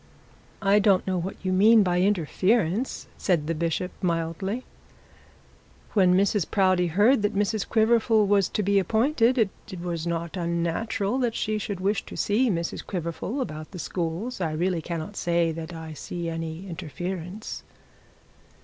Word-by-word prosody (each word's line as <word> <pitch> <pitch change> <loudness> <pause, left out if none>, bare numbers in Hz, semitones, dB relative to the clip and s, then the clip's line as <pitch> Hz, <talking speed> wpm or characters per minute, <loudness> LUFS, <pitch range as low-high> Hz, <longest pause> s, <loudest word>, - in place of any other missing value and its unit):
'I 200 +1 +5
don't 200 -2 +3
know 185 -1 0
what 180 +3 -4
you 185 - +1
mean 215 +3 +6
by 180 -1 +1
interference,' 195 - +1
said 170 -6 +1
the 165 - -1
bishop 170 +3 -1
mildly. 180 +6 -2 1.3
'When 185 -4 +5
Mrs 200 -1 +2
Proudie 185 -3 +3
heard 210 +9 +4
that 205 0 0
Mr 205 +1 0
Quiverful 220 -1 +3
was 200 -2 +3
to 210 - -1
be 200 +1 +3
appointed, 230 - +2
it 200 -4 -2
was 170 -1 -3
not 170 +1 -3
unnatural 180 +7 -1
that 240 -3 0
she 215 0 -1
should 200 -2 -4
wish 200 +2 0
to - - -8
see 235 +5 +2
Mrs 170 -4 -2
Quiverful 180 - -3
about 155 -9 -5
the 190 - -9
schools. 180 +7 -3
I 160 -3 -1
really 175 +1 0
cannot 170 +4 -5
say 170 -1 +1
that 160 +1 -6
I 160 -1 -7
see 170 +2 -5
any 165 +2 -5
interference.' 180 +4 -5
185 Hz, 150 wpm, -26 LUFS, 170-210 Hz, 1.3 s, mean